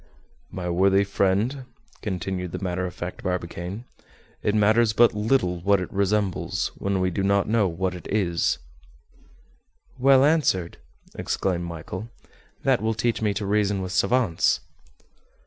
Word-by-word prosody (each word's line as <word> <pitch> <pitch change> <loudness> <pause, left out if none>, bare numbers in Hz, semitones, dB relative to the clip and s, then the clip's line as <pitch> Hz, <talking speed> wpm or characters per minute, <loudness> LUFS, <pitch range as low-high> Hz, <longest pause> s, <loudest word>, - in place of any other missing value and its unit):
"My 90 -1 -5
worthy 95 +3 +3
friend," 100 +7 0 0.4
continued 90 -3 -3
the - - -2
matter 90 0 -1
of 90 - -8
fact 90 0 -6
Barbicane, 90 +4 -4 0.6
"it 105 - 0
matters 110 +1 +4
but 120 +2 +5
little 105 -4 +1
what 100 +3 +3
it 90 - -6
resembles, 100 -1 0
when 100 -1 -2
we 95 0 +1
do 95 - -2
not 100 0 +2
know 110 -2 +2
what 90 +2 -2
it 90 - -9
is." 90 -8 +1 1.4
"Well 135 +1 +6
answered," 140 - +1 0.4
exclaimed 90 -2 -2
Michel. 85 +6 -7 0.5
"That - - +2
will 110 0 0
teach 115 +1 0
me 105 -1 +2
to 100 - -2
reason 100 0 +1
with 90 - -5
savants." 95 -1 +2
100 Hz, 140 wpm, -24 LUFS, 90-110 Hz, 1.4 s, Well